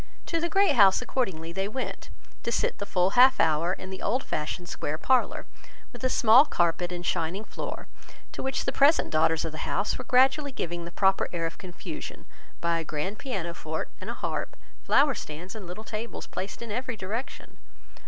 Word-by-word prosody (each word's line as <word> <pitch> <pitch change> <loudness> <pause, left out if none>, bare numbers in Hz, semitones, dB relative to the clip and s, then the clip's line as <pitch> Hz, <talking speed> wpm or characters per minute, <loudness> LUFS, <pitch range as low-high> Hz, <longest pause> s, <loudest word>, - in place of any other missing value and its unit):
To 335 - -1
the 340 - 0
Great 390 -1 +4
House 195 -4 +7
accordingly 185 -11 -2
they 195 +2 -1
went, 260 +5 -5 0.3
to 235 - -2
sit - - 0
the 200 - -4
full 185 -1 +2
half 255 +3 +6
hour 160 +2 +3
in 185 0 -7
the 190 - -7
old 255 +3 0
fashioned 160 +4 -3
square 155 -3 -3
parlour, 260 +8 +1 0.5
with 245 - -11
a 255 - +2
small 240 +2 +7
carpet 175 - 0
and 175 0 -5
shining 175 +5 -1
floor, - - -6 0.4
to - - -6
which 265 0 -1
the - - +1
present 285 +4 +4
daughters 160 0 +2
of 160 - -3
the 155 - -8
house 200 - -1
were - - -4
gradually 270 +3 +3
giving 175 -8 -4
the 170 - -7
proper 190 +1 +2
air 170 -2 -2
of 165 - -5
confusion 180 -3 -8 0.4
by 170 0 +1
a - - -3
grand 160 +7 -4
piano 190 -11 -3
forte 160 -2 -4
and - - -6
a - - -3
harp, - - -4 0.2
flower 280 0 +4
stands 170 -2 -7
and 210 -5 -8
little 180 +5 -7
tables 220 +1 -5
placed 195 +4 -6
in 230 - -7
every 250 +1 -3
direction. 215 +7 -6
190 Hz, 195 wpm, -27 LUFS, 170-250 Hz, 0.5 s, House